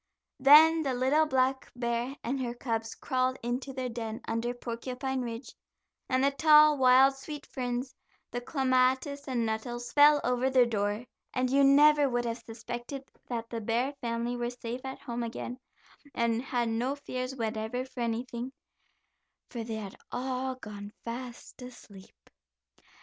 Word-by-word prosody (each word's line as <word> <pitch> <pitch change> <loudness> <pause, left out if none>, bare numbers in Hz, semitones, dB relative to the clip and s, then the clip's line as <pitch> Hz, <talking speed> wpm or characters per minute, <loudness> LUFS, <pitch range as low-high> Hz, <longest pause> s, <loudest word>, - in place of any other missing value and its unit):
Then 310 +4 +8
the 270 -4 -1
little 280 +5 +3
black 265 -1 +1
bear 240 +2 -2
and 260 +3 -2
her 240 -1 -3
cubs 225 -2 -3
crawled 255 +1 0
into 250 +3 -3
their 260 -1 -3
den 225 -2 -5
under 230 +2 -1
Porcupine 255 +2 -4
Ridge, 235 +1 -6 0.6
and 255 0 +2
the 280 - +4
tall, 305 +1 +6
wild 260 +1 +6
sweet 295 +2 -8
ferns, 250 0 -4 0.4
the 245 - -3
clematis 265 +2 +1
and 245 -3 0
nettles 240 +2 -4
fell 295 0 +7
over 250 +1 +1
their 260 -2 +5
door, 210 0 -1 0.3
and 255 0 +1
you 280 +1 +4
never 290 +1 +6
would 240 -1 -1
have 230 0 -3
suspected 240 +4 -7 0.2
that 230 -2 -4
the 230 -1 -3
bear 235 +6 0
family 235 +1 -2
were 240 0 -2
safe 245 0 -6
at 265 0 -5
home 240 0 -5
again, 240 +2 -5 0.6
and 230 0 +1
had 245 -3 -1
no 245 +5 -1
fears 255 -2 -5
whatever 225 +1 -3
for 260 - -12
anything, 240 +2 -3 1.0
for 235 -2 -4
they 225 0 -4
had 205 -3 -6 0.2
all 260 +1 -2
gone 205 -4 -9
fast 240 +2 -7
asleep. 210 -6 -13
250 Hz, 150 wpm, -29 LUFS, 235-265 Hz, 1.0 s, Then